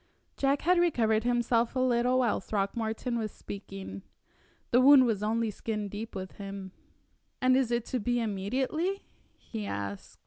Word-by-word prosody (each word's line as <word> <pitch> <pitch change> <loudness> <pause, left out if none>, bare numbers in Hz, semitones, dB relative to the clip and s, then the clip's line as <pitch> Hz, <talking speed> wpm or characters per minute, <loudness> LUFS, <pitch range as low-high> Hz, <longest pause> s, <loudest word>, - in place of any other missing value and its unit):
Jack 275 +1 +1
had 360 +1 +4
recovered 225 -11 +2
himself 240 0 +1
a - - +1
little 250 0 +2
while 245 -4 +2
Throckmorton 220 +4 -2
was 215 -2 -3
speaking. 100 - -8 0.7
The 245 - +5
wound 270 0 +8
was 220 -4 0
only 220 +1 0
skin 210 -1 -4
deep 210 +3 -7
with 190 -1 -6
him. 195 -1 -7 0.7
"And 255 0 +4
is 260 -3 +2
it 235 -1 0
to 255 - -1
be 245 +3 0
immediately?" 260 - -1 0.3
he 215 -3 -6
asked. 100 0 -5
230 Hz, 150 wpm, -29 LUFS, 205-255 Hz, 0.7 s, wound